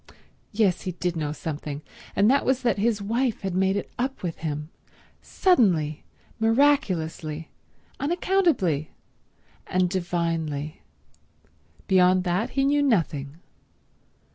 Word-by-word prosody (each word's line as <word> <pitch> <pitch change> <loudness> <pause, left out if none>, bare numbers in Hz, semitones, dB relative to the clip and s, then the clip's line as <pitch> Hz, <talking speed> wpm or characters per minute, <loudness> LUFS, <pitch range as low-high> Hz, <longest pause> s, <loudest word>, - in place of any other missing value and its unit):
Yes, 205 -5 +2
he 185 - -4
did 175 0 -2
know 150 -2 -2
something, 150 -1 -5 0.3
and 200 +2 +4
that 275 +4 +4
was 260 0 +1
that 235 -4 +1
his 210 -1 +1
wife 230 +2 0
had 190 -2 -3
made 190 +1 +2
it - - -5
up 265 -1 -2
with 170 -3 -4
him—suddenly, 155 - -1 0.4
miraculously, 185 - +1 0.5
unaccountably, 290 - +1 0.8
and 180 -1 +1
divinely. 165 -4 -2 1.0
Beyond 185 -1 +4
that 180 +5 0
he 270 - +4
knew 290 +1 +3
nothing. 165 - 0
185 Hz, 110 wpm, -25 LUFS, 160-235 Hz, 1.0 s, and